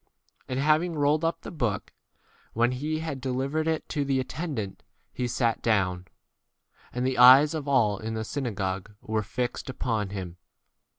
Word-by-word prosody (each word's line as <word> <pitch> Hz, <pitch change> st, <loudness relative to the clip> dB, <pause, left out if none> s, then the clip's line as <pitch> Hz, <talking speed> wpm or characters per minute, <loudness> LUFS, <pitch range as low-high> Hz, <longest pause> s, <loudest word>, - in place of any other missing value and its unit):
And 130 Hz, 0 st, -2 dB
having 155 Hz, +4 st, +2 dB
rolled 150 Hz, +2 st, +2 dB
up 165 Hz, 0 st, 0 dB
the -, -, -8 dB
book, 120 Hz, -, -2 dB, 0.6 s
when 120 Hz, +2 st, +2 dB
he 155 Hz, +5 st, -2 dB
had 150 Hz, -5 st, -4 dB
deli 130 Hz, 0 st, -1 dB
vered 155 Hz, +3 st, -1 dB
it 160 Hz, -1 st, -1 dB
to 145 Hz, -, -1 dB
the 135 Hz, -1 st, +1 dB
attendant, 130 Hz, -, -4 dB, 0.3 s
he 125 Hz, -, -2 dB
sat 120 Hz, -1 st, 0 dB
down; 95 Hz, -5 st, +1 dB, 0.8 s
and 125 Hz, +1 st, -2 dB
the 130 Hz, -1 st, 0 dB
eyes 130 Hz, +5 st, +9 dB
of 150 Hz, -3 st, -4 dB
all 110 Hz, -8 st, +3 dB
in 110 Hz, +1 st, -4 dB
the 110 Hz, 0 st, -3 dB
synagogue 100 Hz, -7 st, -3 dB
were 110 Hz, 0 st, -1 dB
fixed 125 Hz, +5 st, -3 dB
upon 115 Hz, -6 st, -2 dB
him. 90 Hz, -3 st, -6 dB
125 Hz, 165 wpm, -27 LUFS, 110-145 Hz, 0.8 s, eyes